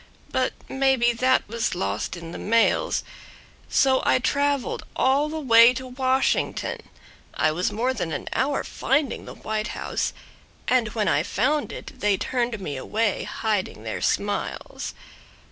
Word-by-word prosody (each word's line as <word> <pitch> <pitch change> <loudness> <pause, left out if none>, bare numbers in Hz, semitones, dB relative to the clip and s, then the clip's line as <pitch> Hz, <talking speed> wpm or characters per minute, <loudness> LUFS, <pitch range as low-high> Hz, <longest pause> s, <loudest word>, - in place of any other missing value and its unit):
But - - +1
maybe 265 -3 +2
that 260 +2 +2
was 230 0 -1
lost 100 - -2
in 165 -1 -8
the - - -7
mails. 230 - +2 0.7
So 265 -1 +3
I - - +4
traveled 280 +1 0
all 275 +3 +2
the 315 +1 -4
way 235 -3 +7
to 260 0 -5
Washington. 260 +1 0 0.6
I 155 - +2
was 175 +4 -1
more 245 +5 0
than 180 -9 -3
an - - -4
hour 280 +1 0
finding 275 0 -1
the - - -9
White 215 0 -3
House. - - -1 0.6
And 250 -3 +3
when 210 -3 +1
I - - +3
found 285 +8 0
it 260 - -9
they 205 -3 +2
turned 240 -1 -1
me 150 -8 -4
away, 210 +9 -1
Hiding 210 -4 -2
their - - -4
smiles. - - -2
240 Hz, 145 wpm, -24 LUFS, 210-265 Hz, 0.7 s, way